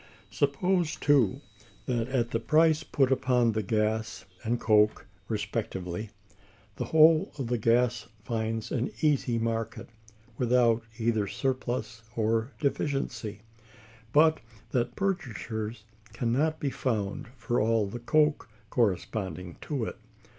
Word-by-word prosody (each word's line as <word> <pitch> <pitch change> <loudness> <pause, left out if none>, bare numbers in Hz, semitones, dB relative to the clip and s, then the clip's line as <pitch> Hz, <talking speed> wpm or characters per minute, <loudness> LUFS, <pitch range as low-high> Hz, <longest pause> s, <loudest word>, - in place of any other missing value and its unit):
Suppose, 155 - +1
too, 135 -3 +3 0.4
that, 120 -2 -1
at 125 -3 0
the 115 - 0
price 155 +4 +4
put 135 -4 +1
upon 125 -3 +3
the 110 0 -1
gas 110 +1 -1 0.2
and 120 +1 0
coke 105 -1 +3 0.2
respectively, 105 -3 -3 0.7
the - - -2
whole 160 0 +5
of 135 - -3
the 120 0 -1
gas 120 0 +2 0.2
finds 110 -1 -2
an 125 0 0
easy 140 -6 +2
market, 115 0 -3 0.5
without 120 -2 +3 0.2
either 110 -3 +1
surplus 120 -1 -2
or 115 +2 +1
deficiency, 135 -7 -2 0.7
but 155 +3 +5 0.3
that 120 -1 0
purchasers 115 - -3 0.3
can 115 0 -1
not 155 +5 +1
be 140 - -1
found 110 +1 -2
for 120 -2 0
all 110 -1 +2
the 115 +5 -6
coke 150 +2 +2 0.2
corresponding 95 -5 -1
to 135 -7 -2
it. - - -6
120 Hz, 120 wpm, -28 LUFS, 110-135 Hz, 0.7 s, whole